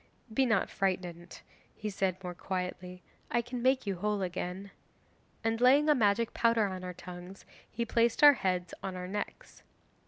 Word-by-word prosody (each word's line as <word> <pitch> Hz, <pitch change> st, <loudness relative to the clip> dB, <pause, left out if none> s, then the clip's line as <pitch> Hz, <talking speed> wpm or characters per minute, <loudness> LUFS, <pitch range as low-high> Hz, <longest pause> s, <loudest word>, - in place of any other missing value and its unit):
'"Be 265 Hz, +2 st, +3 dB
not 220 Hz, -5 st, +1 dB
frightened," 180 Hz, -3 st, -3 dB, 0.3 s
he 210 Hz, 0 st, -4 dB
said 190 Hz, -1 st, -1 dB
more 180 Hz, -1 st, -4 dB
quietly, 180 Hz, 0 st, -5 dB, 0.3 s
"I 240 Hz, -, +1 dB
can 245 Hz, +1 st, -5 dB
make 260 Hz, 0 st, +2 dB
you 195 Hz, -2 st, -2 dB
whole 205 Hz, +1 st, -1 dB
again," 185 Hz, +2 st, -4 dB, 0.7 s
and 225 Hz, +1 st, 0 dB
laying 280 Hz, +5 st, +6 dB
a -, -, +7 dB
magic 225 Hz, -2 st, +2 dB
powder 230 Hz, -2 st, +3 dB
on 185 Hz, -2 st, -4 dB
our 180 Hz, -1 st, -6 dB
tongues 180 Hz, +2 st, -10 dB, 0.2 s
he 235 Hz, -, -3 dB
placed 235 Hz, +3 st, +2 dB
our 290 Hz, -1 st, +11 dB
heads 180 Hz, -7 st, -1 dB
on 190 Hz, -1 st, -4 dB
our 180 Hz, 0 st, -5 dB
necks. 205 Hz, +2 st, -6 dB
195 Hz, 165 wpm, -31 LUFS, 180-230 Hz, 0.7 s, our